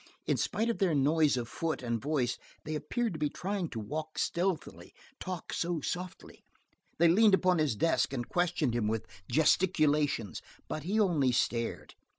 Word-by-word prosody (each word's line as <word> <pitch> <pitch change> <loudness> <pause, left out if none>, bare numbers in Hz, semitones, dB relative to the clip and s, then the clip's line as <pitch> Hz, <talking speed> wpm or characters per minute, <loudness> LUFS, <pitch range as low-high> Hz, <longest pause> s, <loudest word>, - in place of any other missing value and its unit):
In - - +2
spite 225 - -1
of - - -6
their 185 -6 +2
noise 145 0 +3
of 120 -2 -3
foot 160 +1 -3
and 115 -2 -1
voice 135 -4 0 0.2
they 155 - -4
appeared 180 +9 -2
to 155 - -6
be 150 -1 +1
trying 190 -1 -3
to 115 - -5
walk 155 +8 -5
stealthily, 180 -1 -2 0.2
talk 185 -3 -5
so 170 -1 -1
softly. 180 +4 -6 0.5
They 170 - +5
leaned 205 +4 +6
about 185 -2 +2
his 150 -7 +1
desk 165 +6 +1
and 120 -3 -3
questioned 175 -7 0
him 120 -3 0
with 110 -2 -1 0.3
gesticulations, 150 - +2 0.3
but 155 - -4
he 205 +5 +1
only 160 -11 +3
stared. 115 -1 -1
155 Hz, 165 wpm, -31 LUFS, 130-180 Hz, 0.5 s, leaned